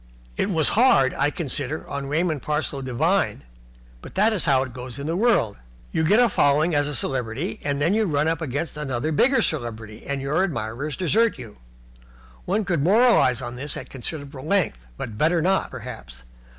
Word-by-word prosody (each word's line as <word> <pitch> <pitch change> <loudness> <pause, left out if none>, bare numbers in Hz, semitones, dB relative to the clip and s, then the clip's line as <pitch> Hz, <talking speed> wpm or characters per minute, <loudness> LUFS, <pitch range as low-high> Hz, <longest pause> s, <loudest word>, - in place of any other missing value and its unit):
It - - 0
was 160 -5 +2
hard, 210 - +4
I 145 +2 +1
consider, 145 -1 -3
on 140 -1 -4
Raymond 155 0 0
Parsloe 150 -1 -2
Devine, 130 -2 0 0.6
but - - -12
that 215 +3 +3
is 195 - 0
how 135 -2 +3
it 130 -3 -8
goes 125 -1 -7
in 140 - -5
this 165 +2 -1
world. 195 - +2 0.3
You 160 - 0
get 205 +8 +4
a 245 - +6
following 155 -3 +2
as 145 -1 +2
a 145 - -3
celebrity, 120 -4 -2
and 140 -1 -1
then 160 +6 +2
you 220 0 +2
run 150 -3 +1
up 165 0 0
against 145 +1 -3
another 140 0 -2
bigger 260 - +3
celebrity 115 -7 -4
and 140 -1 -2
your 140 +7 0
admirers 135 - -3
desert 220 +6 +2
you. 115 -5 -10 0.9
One 205 +3 0
could 170 -5 0
moralize 185 - +4
on 120 0 -6
this 140 +3 -5
at - - -8
considerable 140 +1 -7
length, 150 - 0
but 110 -2 -6
better 165 +3 +3
not, 190 +4 +1
perhaps. 60 0 -9
145 Hz, 185 wpm, -23 LUFS, 130-170 Hz, 0.9 s, a